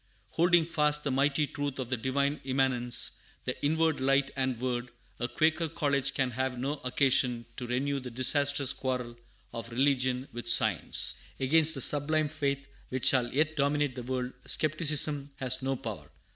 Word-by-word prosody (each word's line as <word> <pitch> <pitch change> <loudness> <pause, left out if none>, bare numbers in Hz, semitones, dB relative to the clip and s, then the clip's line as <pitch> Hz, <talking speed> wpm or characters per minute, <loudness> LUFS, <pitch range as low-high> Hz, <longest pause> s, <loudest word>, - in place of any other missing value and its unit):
Holding 170 0 +4
fast 150 -2 +1
the 140 - -1
mighty 140 +3 +2
truth 145 -1 -4
of 130 -3 -4
the - - +2
Divine 140 +4 -1
Immanence, 130 -2 +1 0.3
the 125 - -2
Inward 160 +1 +2
Light 135 +1 +2
and 130 -3 -1
Word, 125 -1 -2 0.3
a 120 - -1
Quaker 160 +3 +1
college 140 -3 0
can 130 -2 0
have 130 +1 -2
no 140 +4 -3
occasion 125 -2 +1
to 125 - -4
renew 135 +3 -1
the 125 -1 -7
disastrous 140 +2 +2
quarrel 125 -3 -3 0.4
of 115 0 -6
religion 130 0 +1
with 120 0 -5
science. - - +1 0.2
Against 160 +4 +5
the 135 - -4
sublime 150 +3 +1
faith 140 -2 -2 0.2
which 130 -1 -3
shall 125 -2 +2
yet 155 +3 +1
dominate 145 -1 +1
the 125 - -6
world, 125 +1 -3
skepticism 150 -2 +1
has 130 0 -2
no 135 +1 -1
power. 105 - -7
135 Hz, 160 wpm, -29 LUFS, 125-145 Hz, 0.4 s, Against